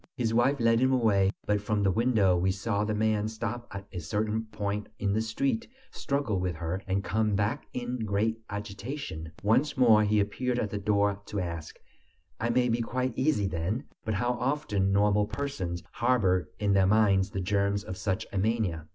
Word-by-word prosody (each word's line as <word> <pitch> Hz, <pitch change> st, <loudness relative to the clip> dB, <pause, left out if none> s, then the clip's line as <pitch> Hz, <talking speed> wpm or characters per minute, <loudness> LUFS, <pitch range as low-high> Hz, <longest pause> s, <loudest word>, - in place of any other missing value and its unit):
His 115 Hz, -2 st, 0 dB
wife 130 Hz, +4 st, +3 dB
led 115 Hz, -1 st, +4 dB
him 130 Hz, +1 st, +3 dB
away, 105 Hz, -7 st, +3 dB, 0.2 s
but 105 Hz, -1 st, +1 dB
from 105 Hz, 0 st, 0 dB
the 95 Hz, -, +3 dB
window 110 Hz, -4 st, +3 dB
we 90 Hz, +2 st, +1 dB
saw 100 Hz, +2 st, -1 dB
the 105 Hz, 0 st, -1 dB
man 110 Hz, 0 st, +1 dB
stop 115 Hz, +2 st, -4 dB
at 100 Hz, 0 st, -7 dB
a 90 Hz, -, -5 dB
certain 105 Hz, +6 st, -1 dB
point 105 Hz, -1 st, -3 dB
in 100 Hz, -1 st, 0 dB
the 110 Hz, -, +1 dB
street, 135 Hz, -, -1 dB, 0.2 s
struggle 140 Hz, -9 st, -1 dB
with 90 Hz, -2 st, -1 dB
her, 85 Hz, +4 st, -3 dB
and 95 Hz, +1 st, 0 dB
come 110 Hz, 0 st, +1 dB
back 105 Hz, +8 st, -1 dB
in 125 Hz, 0 st, -4 dB
great 110 Hz, +2 st, 0 dB
agitation. 105 Hz, -, -6 dB
Once 130 Hz, +8 st, +2 dB
more 115 Hz, -4 st, +6 dB
he 105 Hz, 0 st, +2 dB
appeared 120 Hz, +5 st, -1 dB
at 105 Hz, -4 st, -1 dB
the 105 Hz, -, -2 dB
door 100 Hz, 0 st, +1 dB
to 105 Hz, -, -3 dB
ask: 85 Hz, -4 st, -5 dB, 0.6 s
"I 115 Hz, -, 0 dB
may 125 Hz, +1 st, +3 dB
be 120 Hz, 0 st, +1 dB
quite 125 Hz, +2 st, -1 dB
easy 130 Hz, -6 st, +1 dB
then?" 95 Hz, -, -2 dB, 0.2 s
But 110 Hz, -1 st, -1 dB
how 120 Hz, +5 st, +1 dB
often 120 Hz, -8 st, 0 dB
normal 105 Hz, +1 st, +3 dB
persons 105 Hz, -9 st, -4 dB
harbor 95 Hz, -9 st, +2 dB
in 105 Hz, -1 st, +1 dB
their 95 Hz, -1 st, +4 dB
minds 100 Hz, -2 st, +4 dB
the 95 Hz, -, -4 dB
germs 100 Hz, +1 st, 0 dB
of 95 Hz, -, -6 dB
such 95 Hz, 0 st, -2 dB
a 100 Hz, -, 0 dB
mania! 95 Hz, -7 st, 0 dB
105 Hz, 190 wpm, -29 LUFS, 100-115 Hz, 0.6 s, more